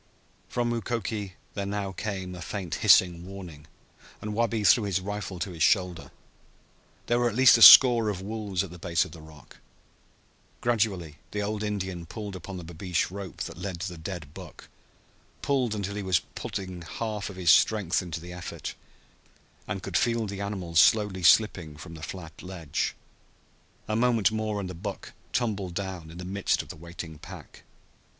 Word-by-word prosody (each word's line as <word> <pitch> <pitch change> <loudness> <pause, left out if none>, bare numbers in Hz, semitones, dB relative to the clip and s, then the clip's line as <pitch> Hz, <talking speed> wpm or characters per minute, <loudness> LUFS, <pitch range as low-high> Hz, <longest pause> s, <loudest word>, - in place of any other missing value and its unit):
From 120 -1 0
Mukoki 110 -4 -3 0.2
there 100 -2 -3
now 100 -1 -2
came 95 -2 -4
a 90 - -8
faint 90 -1 -5
hissing 85 -2 +5
warning, 90 -6 -10 0.5
and 105 0 -5
Wabi 115 -1 0
threw 105 +2 +5
his 95 -2 0
rifle 100 0 -5
to 95 +2 -3
his 85 -2 -9
shoulder. 90 -3 +2 1.0
There 120 0 +2
were 120 0 +3
at 105 - -6
least 130 0 +8
a 115 - +1
score 120 -3 +10
of 100 -3 -3
wolves 100 -2 -3
at 95 - -8
the 90 - -11
base 85 -1 +1
of - - -11
the 85 - -11
rock. 75 -3 -15 1.0
Gradually 100 -10 0
the 105 0 -3
old 105 +1 -2
Indian 95 -5 -3
pulled 105 +1 -6
upon 95 +2 -7
the 90 - -7
babeesh 85 +1 -2
rope 100 -2 -6
that 80 - -8
led 90 -2 -5
to 95 - -2
the 90 - -9
dead 80 -4 -7
buck - - -11 0.7
pulled 130 -6 +1
until 100 -1 -3
he 105 - -4
was 95 -2 +2 0.2
putting 95 -3 -5
a - - -10
half 105 0 -4
of 100 - -9
his 90 -2 +4
strength 100 -5 +3
into 85 -2 -5
the 90 +2 -9
effort, 90 0 -6 0.9
and 95 0 -4
could 95 - -6
feel 115 -1 +1
the 100 -1 -5
animal 95 -4 -4
slowly 100 +3 +4
slipping 90 -4 +4
from 80 +2 -10
the 80 - -10
flat 85 -2 -8
ledge. 90 -6 -3 0.9
A 110 - -1
moment 115 -2 +3
more 110 -1 -2
and 95 - -4
the 90 - -6
buck 95 +3 -7 0.2
tumbled 100 -8 -1
down 95 -4 -5
in 85 - -11
the 90 - -7
midst 95 +1 0
of - - -17
the - - -7
waiting 85 -1 -9
pack. - - -11
95 Hz, 180 wpm, -27 LUFS, 85-105 Hz, 1.0 s, score